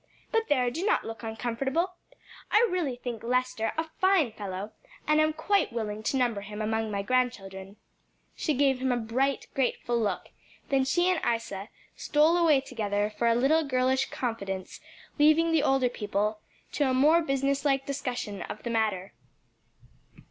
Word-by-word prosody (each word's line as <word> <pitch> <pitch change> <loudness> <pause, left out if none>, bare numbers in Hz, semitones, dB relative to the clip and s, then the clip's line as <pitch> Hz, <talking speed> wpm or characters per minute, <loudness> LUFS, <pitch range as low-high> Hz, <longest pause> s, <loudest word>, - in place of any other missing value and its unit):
"But 450 -1 +1
there, 250 -4 +2
do 330 +8 -4
not 425 - +1
look 225 0 -7
uncomfortable; 245 +9 -2 0.6
I 455 +3 +5
really 330 -9 -1
think 245 -2 -6
Lester 250 -2 0
a 320 - +1 0.2
fine 375 - +3
fellow, 200 0 -6 0.3
and 305 0 +4
am 310 0 +3
quite 320 +3 +1
willing 215 -2 -3
to 245 +5 0
number 240 -5 +1
him 210 +1 -8
among 220 0 -1
my 200 -1 -2
grandchildren." 200 -5 -2 0.6
She 305 - -1
gave 270 -1 +2
him 260 0 +1
a 245 - +1
bright, 255 +4 0
grateful 240 -2 0
look; 210 - -2 0.4
then 270 -1 +2
she 350 +7 +2
and 365 -2 +2
Isa 225 -3 -2 0.3
stole 305 +3 +3
away 320 -6 +4
together 210 -5 -2
for 235 - +1
a 230 - +4
little 290 +7 +3
girlish 260 -1 +1
confidence, 195 -6 -4 0.4
leaving 310 +3 +5
the 320 -2 +3
older 270 -3 +3
people 210 -2 -2 0.3
to 285 -3 +1
a 260 - +1
more 305 +6 +5
business 275 -2 0
like 270 -2 +1
discussion 250 -8 -4
of 215 - -7
the 235 - -3
matter. 210 -4 -1
255 Hz, 165 wpm, -28 LUFS, 220-290 Hz, 0.6 s, I